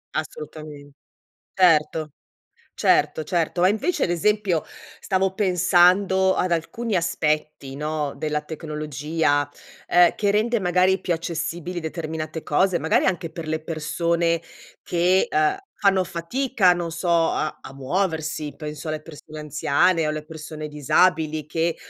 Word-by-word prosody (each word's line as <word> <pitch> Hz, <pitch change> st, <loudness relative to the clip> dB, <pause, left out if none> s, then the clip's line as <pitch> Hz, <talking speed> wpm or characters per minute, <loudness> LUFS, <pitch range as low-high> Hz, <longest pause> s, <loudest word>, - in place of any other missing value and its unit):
Assolutamen 155 Hz, -2 st, -7 dB, 0.6 s
certo, 155 Hz, -4 st, +3 dB, 0.6 s
certo, 150 Hz, +1 st, +2 dB
certo. 175 Hz, -1 st, -1 dB
Ma, 185 Hz, -, +6 dB
invece, 250 Hz, -, 0 dB
ad -, -, -1 dB
esempio, 190 Hz, -1 st, +1 dB, 0.4 s
stavo 190 Hz, -1 st, 0 dB
pensando 190 Hz, 0 st, +3 dB
ad 180 Hz, -, 0 dB
alcuni 210 Hz, +7 st, -2 dB
aspetti, 155 Hz, -5 st, -1 dB
no, 150 Hz, -1 st, -2 dB
della 150 Hz, +1 st, -2 dB
tecnologia, 150 Hz, -1 st, -2 dB, 0.4 s
uhm, 175 Hz, -1 st, +5 dB
che 205 Hz, -1 st, +1 dB
rende, 220 Hz, +2 st, +1 dB
magari, 185 Hz, +1 st, +2 dB
più 175 Hz, -, -1 dB
accessibili 170 Hz, +1 st, -4 dB
determinate 160 Hz, -1 st, -5 dB
cose, 180 Hz, +4 st, +2 dB
magari 160 Hz, -, +2 dB
anche 175 Hz, -3 st, -1 dB
per 160 Hz, -2 st, -7 dB
le 155 Hz, 0 st, -1 dB
persone 170 Hz, +1 st, 0 dB, 0.4 s
che, 180 Hz, +2 st, +2 dB
uhm, 155 Hz, 0 st, +2 dB, 0.3 s
fanno 190 Hz, -2 st, +4 dB
fatica, 190 Hz, -, +1 dB
non 175 Hz, -1 st, -3 dB
so, 170 Hz, +2 st, -4 dB
a 165 Hz, -2 st, +1 dB
a 135 Hz, -, -11 dB
muoversi. 155 Hz, 0 st, -2 dB
Penso 150 Hz, +1 st, -7 dB
alle 155 Hz, 0 st, -3 dB
persone 155 Hz, -1 st, -11 dB
anziane 155 Hz, +3 st, +1 dB
o -, -, 0 dB
alle 155 Hz, 0 st, -4 dB
persone 155 Hz, -1 st, -8 dB
disabili 155 Hz, +1 st, +1 dB
che, 165 Hz, +2 st, -1 dB
165 Hz, 130 wpm, -23 LUFS, 155-180 Hz, 0.6 s, Ma